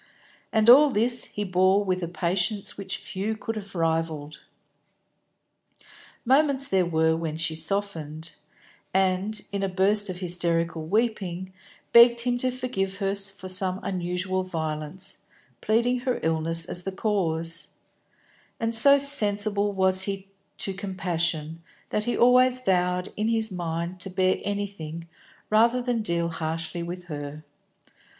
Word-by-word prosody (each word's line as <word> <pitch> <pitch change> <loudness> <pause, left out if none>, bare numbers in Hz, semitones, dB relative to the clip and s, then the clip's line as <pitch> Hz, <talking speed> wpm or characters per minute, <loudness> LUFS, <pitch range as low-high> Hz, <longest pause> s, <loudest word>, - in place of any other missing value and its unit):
And 220 0 +2
all 285 +5 +8
this 240 0 +1
he 210 - -5
bore 190 +1 +2
with 185 -1 -1
a 170 - -2
patience 180 +4 -1
which 195 -1 -4
few 210 +4 -4
could 225 +1 -5
have 200 -2 -8
rivalled. 160 -3 -2 1.8
Moments 275 +1 +3
there 190 -6 +1
were 160 -1 +2
when 160 -1 -4
she 165 0 +1
softened, 160 -2 -3 0.6
and, 190 +3 +1
in 200 -1 -2
a 195 - 0
burst 200 +2 +2
of 180 - -4
hysterical 170 -3 -1
weeping, 190 -3 -1 0.4
begged 235 0 +8
him 245 0 0
to 255 - 0
forgive 245 -7 -3
her 195 -1 -1
for 195 -1 -3
some 185 0 0
unusual 185 0 -2
violence, 160 -1 -5 0.4
pleading 240 +3 +1
her 250 0 -2
illness 165 +1 +1
as 175 - -2
the 195 - -4
cause; 170 -5 -2 0.9
and 225 0 -1
so 280 +5 +7
sensible 210 -7 +3
was 190 -1 +2
he 195 -1 -5 0.3
to 195 - 0
compassion, 170 -4 -3 0.3
that 210 - -1
he 240 - -1
always 250 +1 +5
vowed 180 -5 0
in 215 +1 -1
his 225 -1 0
mind 170 0 -4
to 190 - -4
bear 185 0 +1
anything 195 -5 -5 0.4
rather 230 +3 +4
than 245 -2 -1
deal 170 -4 0
harshly 165 +1 -4
with 175 +1 -6
her. 150 -2 -7
190 Hz, 135 wpm, -25 LUFS, 170-215 Hz, 1.8 s, all